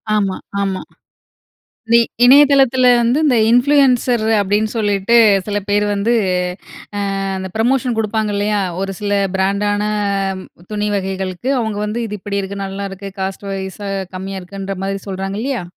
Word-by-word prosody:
ஆமா, 195 -3 0 0.3
ஆமா. 195 -1 -2 1.1
வி 235 - +7 0.3
இணையதளத்தில 265 -2 +6
வந்து 240 +6 +2
இந்த 250 -5 +3
இன்ஃப்ளூயன்சர் 250 -3 +3
அப்படின்னு 205 +2 +1
சொல்லிட்டு 205 +1 +1 0.3
சில 205 0 -1
பேர் 205 0 +2
வந்து, 205 +4 +1 1.1
அ - - -2 0.2
அந்த 190 0 -5
புரமோஷன் 245 +1 +1
குடுப்பாங்க 215 -1 -1
இல்லையா? 205 0 0 0.2
ஒரு 195 0 -2
சில 205 -1 -3 0.2
பிராண்ட் 200 +2 0
ஆன 205 0 -1 0.9
துணி 210 0 -1
வகைகளுக்கு 190 +4 -3
அவங்க 220 -3 -2
வந்து 225 +3 -3
இது 210 - -5
இப்படி 200 +1 -3
இருக்கு, 195 +1 -5
நல்லா 195 +1 -5
இருக்கு. 195 +1 -7
காஸ்ட் 195 +1 -4
வைஸ்ஸா 195 +1 -5 0.3
கம்மியா 190 +1 -5
இருக்குன்ற 195 +1 -6
மாரி 195 0 -2
சொல்றாங்க 195 +1 -4
இல்லையா? 260 -7 -2
205 Hz, 140 wpm, -17 LUFS, 195-235 Hz, 1.1 s, வி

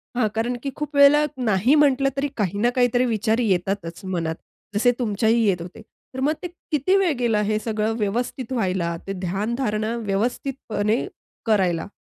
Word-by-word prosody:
हां, 230 -3 +2
कारण 240 +2 0
की 275 - -2
खूप 300 -1 -5
वेळेला 285 +1 +6 0.2
नाही 215 +6 +3
म्हटलं 275 -2 +4
तरी 285 +1 +1
काही 200 -1 -1
ना 240 - +3
काही 245 -1 +4
तरी 245 +1 +3
विचार 225 0 0
येतातच 190 -5 -1
मनात. 165 -3 -2 0.4
जसे 245 +4 +4
तुमच्याही 225 +1 +2
येत 180 -4 +1
होते. 175 +5 -9 0.3
तर 260 - -5
मग 285 +4 +2
ते - - -2 0.2
किती 300 +6 +2
वेळ 380 -4 +2
गेला 225 -4 +2
हे 215 +1 0
सगळं 215 0 -1
व्यवस्थित 235 +4 -2
व्हायला? 180 -6 -1
ते 195 - -2
ध्यान-धारणा 215 +4 -2
व्यवस्थितपणे 220 0 -1 0.4
करायला? 190 -6 +1
220 Hz, 165 wpm, -23 LUFS, 195-250 Hz, 0.4 s, वेळेला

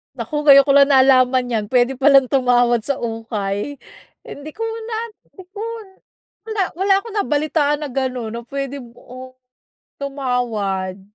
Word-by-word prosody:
Naku! 300 -2 -4
Ngayon 275 -1 +9
ko 280 - +2
lang 280 0 +5
nalaman 255 -1 +4
yan, 220 -3 -1
puwede 245 +3 +1
pa 265 - -3
lang 270 -3 +5
tumawad 245 -3 +2
sa 280 -1 -2
ukay. 225 +2 -4 0.4
Hindi 285 +2 -10
ko 450 - -11
na 450 0 -4 0.3
hindi 375 - -15
ko 405 - -11 0.9
wala, 435 -2 -2 0.2
wala 390 +1 +2
akong 455 -1 -10
nabalitaan 295 -1 0
na 300 - -3
gano'n 255 -3 -3
na 235 - -5
puwede, 275 +1 -5 0.2
oh, 255 +1 -11 0.7
tumawad. 230 -9 -3
265 Hz, 145 wpm, -19 LUFS, 240-290 Hz, 0.9 s, Ngayon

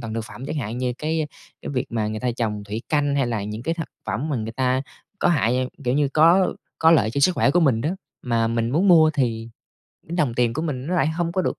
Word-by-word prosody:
toàn 115 -2 -5
thực 115 -1 -3
phẩm 130 +4 -9
chẳng - - -4
hạn, 120 -2 -3
như 125 -1 -1
cái 155 0 -1 0.4
cái - - -5
việc 130 -3 -2
mà 110 -2 -1
người 110 0 -4
ta 125 -1 0
trồng 105 -4 -2
thủy 105 +4 -5
canh, 145 -2 +1
hay 135 - +2
là 115 -4 -2
những 105 +2 -5
cái 165 +4 -1
thật 165 -2 -5 0.2
phẩm 110 +11 -2
mà 145 - -1
người 110 0 -4
ta 130 +1 0 0.4
có - - +2
hại 125 -4 +1 0.2
kiểu 125 - +1
như, 145 0 +2
có 165 +6 +4 0.3
có 160 - +5
lợi 125 -10 +4
cho 140 - -2
sức 180 +5 +4
khỏe - - +3
của 175 +5 +3
mình 130 -8 +3
đó. 150 - -1 0.3
Mà 115 -2 +1
mình 115 0 -1
muốn 180 +8 +2
mua 160 -3 +7
thì 115 -5 -1 0.6
đồng 150 -8 0
tiền 120 -2 +2
của 155 - -2
mình 135 -5 -3
nó 180 - -1
lại 165 - +2
hông 170 +1 -2
có 185 +1 0
được, - - -2
130 Hz, 265 wpm, -23 LUFS, 115-155 Hz, 0.6 s, mua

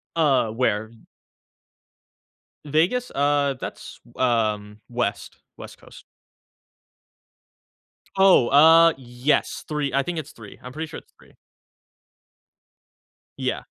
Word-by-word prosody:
Uh, 140 -8 +2
where 110 -2 -1
d 115 -1 -21 1.6
Vegas? 170 - 0
Uh. 145 0 +1
That's, - - -9 0.2
um, 110 -4 -1
West, 120 -4 -3 0.2
West - - -11
Coast. - - -16 2.2
Oh! 190 -11 +5
Ah, 165 +3 +7
yes. 125 +2 -2
3 150 -3 -3
I 140 - +1
think 175 +1 -5
it's 150 -1 -9
3, 105 -3 -14
I'm 125 - -9
pretty 160 +4 -6
sure 155 - -9
it's - - -29
3. - - -22 2.0
Yeah. - - -3
135 Hz, 105 wpm, -23 LUFS, 115-155 Hz, 2.2 s, Ah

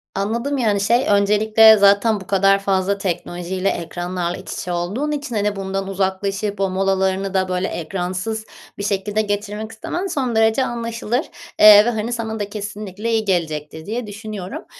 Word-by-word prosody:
Anladım, 235 +8 -1
yani, 210 -5 +1
şey 235 +6 +2
öncelikle 215 +2 +5
zaten 200 +2 +4
bu 190 - -12
kadar 195 0 +3
fazla 195 0 0
teknolojiyle 185 0 -2
ekranlarla 175 +1 -3
iç 185 - -9
içe 180 - -5
olduğun 195 +13 -2
için, 285 -5 -4
hani, 205 0 0
bundan 195 0 -3
uzaklaşıp 195 +1 -2
o 195 -1 +1
molalarını 190 0 0
da, 185 -1 +1
böyle, 180 0 -1
ekransız 185 +6 -4 0.3
bir 200 - -5
şekilde 205 +1 0
geçirmek 210 +1 -4
istemen 350 - -4
son 265 -10 -2
derece 225 +4 +3
anlaşılır, 235 +2 -2 0.3
eee, 210 0 +9
ve, - - +2
hani, 225 +1 -2
sana 225 -2 -4
da 205 -1 -3
kesinlikle 210 +1 -5
iyi 220 -1 +1
gelecektir 160 -4 -2
diye 225 +3 -4
düşünüyorum. 205 -2 -7
205 Hz, 160 wpm, -20 LUFS, 190-220 Hz, 0.3 s, eee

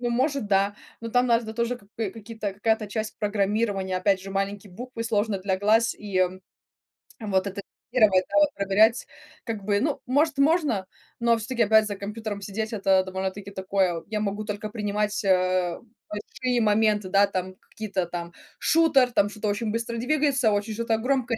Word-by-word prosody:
Ну 240 -1 -1
может, 265 -1 0
да. 200 0 +2 0.3
Но 230 - -4
там 250 +1 +3
надо 230 -2 +1
тоже, 235 +1 -1
как 200 - -22
бы, 215 -4 -1
какие-то 220 -1 -6
какая-то 220 +1 0
часть 215 +1 -4
программирования, 205 -2 0
опять 195 0 +2
же 195 +1 -8
маленькие 195 0 -3
буквы 240 +2 -6
сложно 210 -2 0
для 190 0 -1
глаз 225 +3 +3
и 195 -3 +1 1.0
вот 200 -2 0
это 200 +1 -5 0.3
гировать, 200 -6 +5
да, - - -4
вот 300 - +5
проверять, 210 +4 +3 0.4
как 220 -4 -4
бы 205 0 +2
Ну, 295 -1 0
может, 290 +3 +2
можно, 285 - +2 0.3
но 235 0 +3
всё-таки 230 +2 0
опять 220 +1 +5
за 205 - -3
компьютером 210 0 -5
сидеть- 215 +3 -4
это 195 -2 +3
довольно-таки 190 +1 -4
такое. 190 -2 0
Вот, 165 - -7
я 215 -1 -1
могу 205 +1 -2
только 210 +1 -4
принимать, 210 0 -2
а, 185 -2 +2 0.3
большие 240 +4 -2
моменты, 210 -2 +2
да, 200 +1 +5
там 185 -1 -4 0.2
какие-то 195 -4 -2
там 170 0 -5 0.3
Шутер, 290 -6 +4
там 205 -3 +2
что-то 210 0 -3
очень 210 +1 -1
быстро 230 +1 -3
двигается, 275 -2 +2
очень 205 +2 -1
что-то 230 0 0
громкое 250 -1 0
210 Hz, 175 wpm, -25 LUFS, 195-230 Hz, 1.0 s, гировать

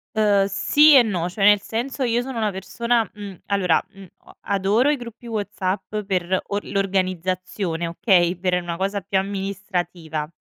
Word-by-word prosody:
Ehm, 205 -2 +3
sì 290 +10 +5
e 260 - +8
no, 180 -6 -2
cioè 195 +2 0
nel 205 0 +6
senso 245 +6 -4
io 240 0 +1
sono 260 -1 -6
una 215 -1 +1
persona, 225 +4 -1
mhmm, 200 -3 -9
allora, 185 -5 +2
mhmm, 195 -1 -13 0.2
o - - -18
adoro 200 +7 +1
i 300 - +3
gruppi 240 -1 -10
WhatsApp 205 -2 -3
per 185 -1 0
or 205 0 -2
l'organizzazione, 185 -2 -2
okay, 175 0 +2
per 180 0 0
una 175 -1 -4
cosa 195 +3 -2
più 190 +1 0
amministrativa, 185 -5 -4
195 Hz, 160 wpm, -22 LUFS, 185-215 Hz, 0.2 s, e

